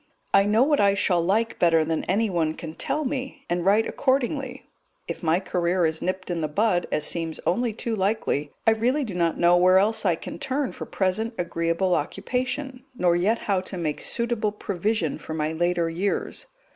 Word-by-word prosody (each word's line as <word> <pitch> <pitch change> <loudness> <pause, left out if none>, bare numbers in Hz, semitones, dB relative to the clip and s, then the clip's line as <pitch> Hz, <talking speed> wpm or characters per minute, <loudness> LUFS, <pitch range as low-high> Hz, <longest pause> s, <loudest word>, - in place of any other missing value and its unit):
I 195 0 +6
know 215 +4 +4
what 290 +1 +2
I 200 0 +4
shall 180 -3 +2
like 220 +6 0
better 165 -2 +4
than 160 0 -1
anyone 180 -6 0
can 160 -2 -7
tell 300 - -2
me, 265 0 -4
and 175 0 0
write 205 +4 +4
accordingly; 265 0 -1 0.4
if - - -5
my 165 0 +2
career 180 -1 0
is 160 0 -1
nipped 185 0 -3
in 170 -1 -2
the 155 - 0
bud, 180 +3 +1
as 150 - 0
seems 165 -2 -2
only 235 +5 +1
too 225 +1 -3
likely, 190 -8 -1
I 225 - +6
really 245 +7 +1
do 220 -7 -5
not 170 -2 0
know 175 +1 +5
where 185 +1 +5
else 215 +3 +2
I 180 -5 +3
can 165 - -8
turn 270 0 -1
for - - -8
present 220 +5 -1
agreeable 170 +1 0
occupation, 250 - -2
nor 175 -6 +2
yet 200 +7 +2
how 195 -3 +1
to 185 0 -7
make 155 -4 -2
suitable 235 -3 -1
provision 200 -4 -2
for 160 - -6
my 155 0 -1
later 175 +1 +1
years. 180 +5 -2
190 Hz, 190 wpm, -25 LUFS, 170-225 Hz, 0.4 s, I